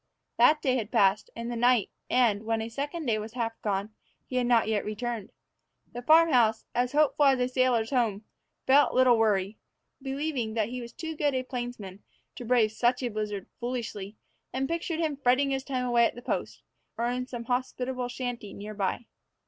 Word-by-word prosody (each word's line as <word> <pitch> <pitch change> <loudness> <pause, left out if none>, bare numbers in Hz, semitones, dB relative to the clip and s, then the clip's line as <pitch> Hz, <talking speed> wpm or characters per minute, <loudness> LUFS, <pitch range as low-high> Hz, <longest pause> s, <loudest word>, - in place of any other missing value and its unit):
That 300 0 +5
day 260 -2 +2
had 220 -3 -3
passed, 205 -3 +3
and 235 +1 -5
the - - -3
night; 245 -2 +3 0.2
and, 230 -5 +3
when 225 0 -1
a 220 +1 -4
second 290 +7 -4
day 220 -4 +1
was 215 +1 -7
half 230 -2 -3
gone, 205 +1 -2 0.3
he 255 - -4
had 245 -1 +1
not 235 -3 +4
yet 215 -2 0
returned. 215 0 -4 0.6
The 245 - -5
farm 320 +5 +5
house, 225 -3 +3
as 245 +1 0
hopeful 295 0 +3
as 270 -2 +4
a 250 - +2
sailor's 255 -3 +1
home, 225 -6 0 0.4
felt 280 +2 +4
little 255 -1 +6
worry, 210 -2 +1 0.4
believing 270 -4 -3
that 220 -1 0
he 250 +1 -5
was 235 0 -8
too 320 +5 -6
good 290 -2 0
a 255 - 0
plainsman 240 -7 -6 0.3
to - - -8
brave 235 -2 +3
such 245 +3 +1
a 245 - 0
blizzard 210 -2 -4
foolishly, 230 -5 -4 0.4
and 265 +1 -1
pictured 335 0 -2
him 310 -4 -1
fretting 275 +1 +2
his 265 -1 -1
time 255 -2 -2
away 240 -1 +4
at - - -1
the 245 - -10
post, - - -3 0.3
or 235 - 0
in 250 +1 -2
some 240 -2 -6
hospitable 250 0 -2
shanty 245 -4 -5
nearer 210 +1 -7
by. 200 +3 -2
245 Hz, 195 wpm, -28 LUFS, 220-260 Hz, 0.6 s, little